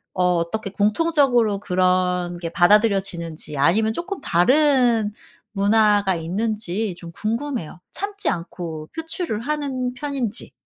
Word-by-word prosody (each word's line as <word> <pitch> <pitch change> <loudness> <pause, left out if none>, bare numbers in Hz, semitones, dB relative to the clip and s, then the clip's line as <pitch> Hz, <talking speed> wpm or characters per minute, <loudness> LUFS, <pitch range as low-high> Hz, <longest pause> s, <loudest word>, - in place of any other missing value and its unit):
어 180 -1 +2
어떻게 195 +4 -3
공통적으로 240 -1 +2
그런 180 -1 0
게 170 -1 -4
받아들여지는지 175 -6 +1
아니면 215 +10 +3
쪼끔 345 - -5
다른 245 - +3 0.4
문화가 205 -1 +3
있는지 205 +3 -2
좀 170 -1 -10
궁금해요. 225 - -4
참지 405 +1 -1
않고 165 -2 -5
표출을 325 - -3
하는 265 -2 -2
편인지. 265 -5 -3
210 Hz, 275 characters per minute, -22 LUFS, 180-250 Hz, 0.4 s, 아니면